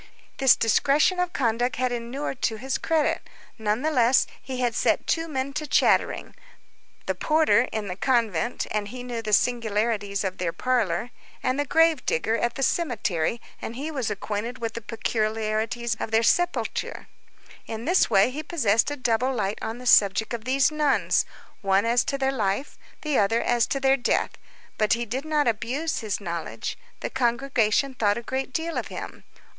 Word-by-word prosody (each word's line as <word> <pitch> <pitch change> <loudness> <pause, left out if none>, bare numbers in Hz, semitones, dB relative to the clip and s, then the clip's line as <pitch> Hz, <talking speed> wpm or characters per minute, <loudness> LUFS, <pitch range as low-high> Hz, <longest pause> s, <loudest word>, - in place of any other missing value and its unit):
This 265 -2 +6
discretion 285 - +3
of 360 -1 0
conduct 240 -2 0
had 255 0 0
inured 245 +3 -4
to 220 - +1
his 265 +3 -2
credit. 320 -2 0 0.3
Nonetheless, 240 +3 +2 0.2
he 260 -1 -6
had 245 -2 +1
set - - +1
two 330 0 0
men 275 -2 -3
to 300 +1 -3
chattering: - - +2 0.7
the - - 0
porter, 310 -5 +3
in 215 -2 -3
the 180 - -4
convent, 230 -3 0
and 210 -1 -1
he 245 +4 -7
knew 240 -2 -4
the 215 -1 -4
singularities 210 -3 +1
of 190 -1 -3
their 175 -2 -1
parlor, 250 -1 0 0.3
and 255 +2 0
the 290 - 0
grave 325 -2 +3
digger, 220 +8 +1
at 235 +1 -1
the 270 - -2
cemetery, 230 - 0 0.2
and 230 - -5
he 290 +5 -4
was 265 -7 -2
acquainted 210 +4 -4
with 230 -1 -4
the 230 - -5
peculiarities 220 +1 -1
of - - -3
their 225 +1 +2
sepulture; 350 +8 0 0.6
in 225 0 -5
this 355 +4 +3
way, 200 +2 +4
he 295 +4 -4
possessed 245 - +1
a 290 - -3
double 250 0 +1
light 210 -5 -2
on 225 +1 -4
the 250 - -10
subject 215 0 +4
of 230 -1 -5
these 265 +2 +3
nuns, 300 -2 +2 0.3
one 195 +1 +2
as 240 +1 +3
to 275 - -1
their 270 0 +1
life, 215 +1 -2 0.3
the 300 -3 +1
other 210 +3 +2
as 235 -1 +2
to 275 - -1
their 270 0 +3
death. 245 - 0 0.5
But 215 0 +3
he 235 +1 -1
did 255 +6 -4
not 300 -3 +1
abuse 240 +8 -1
his 215 -3 -3
knowledge. 170 -4 -4 0.3
The - - -3
congregation 245 0 +1
thought 210 -4 +1
a 235 - -5
great 265 +2 -3
deal 325 +4 -2
of - - -5
him. - - -8
240 Hz, 175 wpm, -25 LUFS, 220-270 Hz, 0.7 s, This